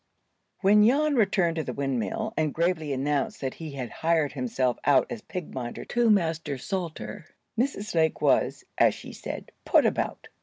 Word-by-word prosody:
WHEN 210 Hz, +2 st, +6 dB
Jan 290 Hz, +7 st, +4 dB
returned 195 Hz, -7 st, +2 dB
to 160 Hz, -, 0 dB
the -, -, -4 dB
windmill, 140 Hz, -, -2 dB
and 155 Hz, -2 st, 0 dB
gravely 165 Hz, -3 st, 0 dB
announced 140 Hz, +1 st, -1 dB
that 130 Hz, -2 st, -2 dB
he 160 Hz, -3 st, -8 dB
had 130 Hz, -4 st, -5 dB
hired 160 Hz, -3 st, +1 dB
himself 125 Hz, -1 st, -1 dB
out 140 Hz, -2 st, +5 dB
as 235 Hz, -3 st, -5 dB
pig 180 Hz, -5 st, -7 dB
minder 120 Hz, -2 st, -5 dB
to 240 Hz, -1 st, +2 dB
Master 165 Hz, -8 st, +1 dB
Salter, 175 Hz, +2 st, -5 dB, 0.3 s
Mrs. 225 Hz, -3 st, -1 dB
Lake 160 Hz, -2 st, +2 dB
was, -, -, +2 dB, 0.2 s
as -, -, +5 dB
she -, -, -10 dB
said, -, -, -7 dB
"put -, -, +4 dB
about." -, -, -1 dB
165 Hz, 165 wpm, -27 LUFS, 140-210 Hz, 0.3 s, WHEN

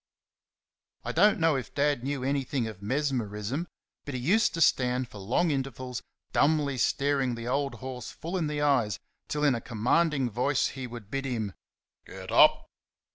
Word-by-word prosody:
I -, -, -1 dB
don't 205 Hz, +5 st, +4 dB
know 165 Hz, -2 st, +3 dB
if 130 Hz, -4 st, -5 dB
Dad 140 Hz, -3 st, +1 dB
knew 135 Hz, -1 st, -2 dB
anything 135 Hz, -2 st, -1 dB
of 110 Hz, -4 st, -7 dB
mesmerism, 125 Hz, -, -2 dB, 0.4 s
but 145 Hz, -, -6 dB
he -, -, -2 dB
used 185 Hz, -, +2 dB
to -, -, -3 dB
stand 125 Hz, -3 st, +3 dB
for 105 Hz, -, -10 dB
long 130 Hz, -, +1 dB
intervals 130 Hz, -2 st, -3 dB, 0.3 s
dumbly 145 Hz, -3 st, +2 dB
staring 135 Hz, 0 st, +1 dB
the 115 Hz, 0 st, -6 dB
old 140 Hz, +2 st, 0 dB
horse 130 Hz, -1 st, -7 dB
full 170 Hz, +4 st, -6 dB
in 170 Hz, -4 st, 0 dB
the 150 Hz, -1 st, -2 dB
eyes 125 Hz, -8 st, +2 dB, 0.3 s
till 150 Hz, 0 st, -2 dB
in 145 Hz, -3 st, +5 dB
a 115 Hz, -, -2 dB
commanding 130 Hz, +5 st, +1 dB
voice 135 Hz, +5 st, +1 dB
he 130 Hz, -2 st, -6 dB
would 115 Hz, -4 st, -10 dB
bid 135 Hz, 0 st, -2 dB
him, 110 Hz, -6 st, -2 dB, 0.5 s
"Get -, -, -8 dB
up!" -, -, +6 dB
135 Hz, 170 wpm, -28 LUFS, 120-145 Hz, 0.5 s, up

